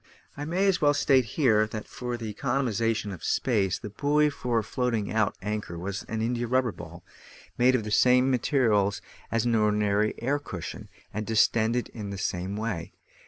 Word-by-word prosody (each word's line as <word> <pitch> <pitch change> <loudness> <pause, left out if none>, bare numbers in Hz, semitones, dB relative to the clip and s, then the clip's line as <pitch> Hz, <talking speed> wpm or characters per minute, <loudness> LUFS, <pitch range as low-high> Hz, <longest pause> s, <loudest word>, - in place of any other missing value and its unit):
I 145 - -5
may 180 +5 0
as 195 -2 +2
well 145 -1 +4
state 135 -3 +3
here, 110 -8 +4
that 110 0 -6
for 125 -1 -5
the 110 -2 -5
economisation 115 -5 -1
of 90 - -10
space 100 -7 +1
the 105 - -8
buoy 150 +5 +2
for 120 -5 -1
floating 115 -3 -1
out 110 -2 +1
anchor 105 -4 -4
was 95 +3 -4
an 110 0 -2
india 120 +1 -1
rubber 130 -1 +2
ball, 85 -1 -11 0.5
made 130 +1 +4
of 120 - 0
the 105 - -5
same 125 +4 +4
materials 110 -6 +2 0.3
as 115 0 +1
an 120 - +2
ordinary 105 -1 +2
air 140 +5 0
cushion, 90 - -7 0.2
and 105 +1 -4
distended 115 +2 +2
in 105 -3 -7
the 100 - -5
same 95 0 -2
way. 105 -6 -4
115 Hz, 175 wpm, -27 LUFS, 105-125 Hz, 0.5 s, well